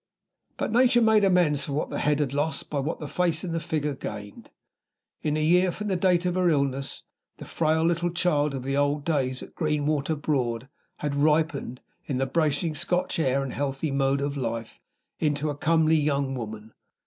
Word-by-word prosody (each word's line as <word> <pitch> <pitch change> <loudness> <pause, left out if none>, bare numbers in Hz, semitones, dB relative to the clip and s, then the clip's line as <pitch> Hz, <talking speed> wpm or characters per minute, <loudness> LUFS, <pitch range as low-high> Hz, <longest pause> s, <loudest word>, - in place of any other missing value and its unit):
But - - -2
Nature 245 +1 +5
made 220 -2 +5
amends 175 -7 +3
for 140 - -4
what 150 - -2
the - - -2
head 150 -1 +2
had 140 -3 -1
lost 150 +3 -2
by 145 - 0
what 150 +5 -3
the 150 - -5
face 170 +1 0
and 175 -3 -3
the 165 - 0
figure 150 -2 -2
gained. 105 -5 -8 0.7
In 150 0 0
a 155 - 0
year 180 +3 +4
from 210 +3 -5
the 190 - +1
date 180 -1 +2
of 180 - +1
her 180 -1 +2
illness, 140 -3 -1 0.3
the - - -9
frail 160 0 +1
little 170 +1 +1
child 150 -5 +1
of 130 - -5
the 135 +1 -1
old 145 +1 +1
days 130 -5 0
at - - -12
Greenwater 150 -1 0
Broad 125 -5 -1 0.4
had 145 - -1
ripened, 150 -3 +1 0.3
in 135 - -1
the 135 - +1
bracing 155 +2 0
Scotch 175 +4 -1
air 135 -2 +1
and 135 - -4
the - - -8
healthy 140 +1 -2
mode 135 0 +1
of 140 0 -2
life, 115 -4 -4 0.4
into 150 0 0
a - - -5
comely 160 +1 +3
young 140 -2 0
woman. 110 -3 -7
150 Hz, 195 wpm, -26 LUFS, 140-165 Hz, 0.7 s, Nature